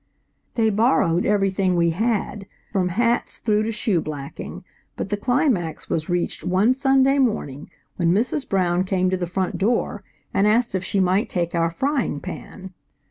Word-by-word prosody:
They 220 -2 +2
borrowed 210 -5 +2
everything 195 -2 +1
we 170 -1 +3
had, 210 +1 -1 0.2
from 185 -2 +1
hats 235 +6 0
through 210 -2 +1
to 220 +1 -1
shoe 210 -5 0
blacking, 145 -3 -7 0.3
but - - -4
the - - +2
climax 210 - 0
was 155 +1 -1
reached 175 0 -1
one 190 +7 +3
Sunday 270 +1 +3
morning 155 - -1 0.3
when 170 -2 +2
Mrs. 250 - 0
Brown 180 -2 +2
came 185 -1 0
to 185 - +1
the 175 -1 -3
front 185 +1 -2
door 210 -1 0 0.3
and 200 - +3
asked 230 +1 +2
if 190 -1 -1
she 195 +2 -1
might 190 +2 +2
take 170 -2 -2
our 165 -1 +1
frying 260 - -1
pan. 190 +1 -8
195 Hz, 165 wpm, -22 LUFS, 175-230 Hz, 0.3 s, we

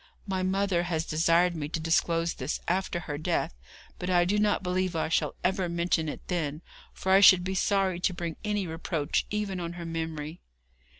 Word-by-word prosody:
My 190 -2 -2
mother 190 -1 +1
has 170 -2 -1
desired 170 +2 +3
me 150 -2 -4
to 165 - -2
disclose 165 +1 +1
this - - -3
after 180 -1 0
her 145 -3 -5
death, 155 - -1 0.5
but 180 - -3
I 175 -1 +4
do 205 +4 +1
not 210 -2 +2
believe 185 0 -1
I 160 - 0
shall - - 0
ever 185 -1 +1
mention 170 -2 0
it - - -8
then, 160 -3 -2 0.3
for 190 - -2
I 190 - +7
should 185 -3 +8
be 190 +1 -2
sorry 190 -2 +1
to 185 - +1
bring 170 -2 -4
any 210 -2 -1
reproach 160 -2 -2
even 210 -3 -2
on 170 -1 -4
her 175 -1 -7
memory.' 160 -1 -4
175 Hz, 190 wpm, -28 LUFS, 165-190 Hz, 0.5 s, should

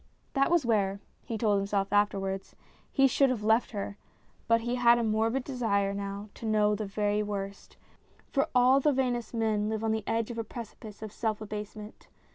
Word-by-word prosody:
That 275 -1 +3
was 340 -5 +3
where 200 -4 +1 0.2
(he 225 - -4
told 210 -2 +2
himself 200 0 -1
afterwards) 195 -2 0 0.4
he 270 - +4
should 270 +1 +4
have 240 -4 -2
left 220 +2 +3
her, 200 -1 -5 0.5
but 230 0 +4
he 240 +1 -2
had 240 -1 +5
a 235 - 0
morbid 225 +4 +1
desire 210 -7 0
now 200 +1 -5
to 225 - -7
know 210 -1 +3
the 210 0 -3
very 205 +1 0
worst; 200 -1 -5 0.5
for 275 +3 +2
all 250 +2 +6
the 295 +1 +3
vainest 245 -3 -1
men 215 -2 +1
live 220 0 -2
on 220 - +1
the 220 -1 -2
edge 225 +1 0
of 230 - -5
a - - -1
precipice 220 -1 -9
of 215 - -6
self 220 -1 -2
abase 210 0 -6
ment. 210 0 -11
220 Hz, 195 wpm, -29 LUFS, 205-235 Hz, 0.5 s, all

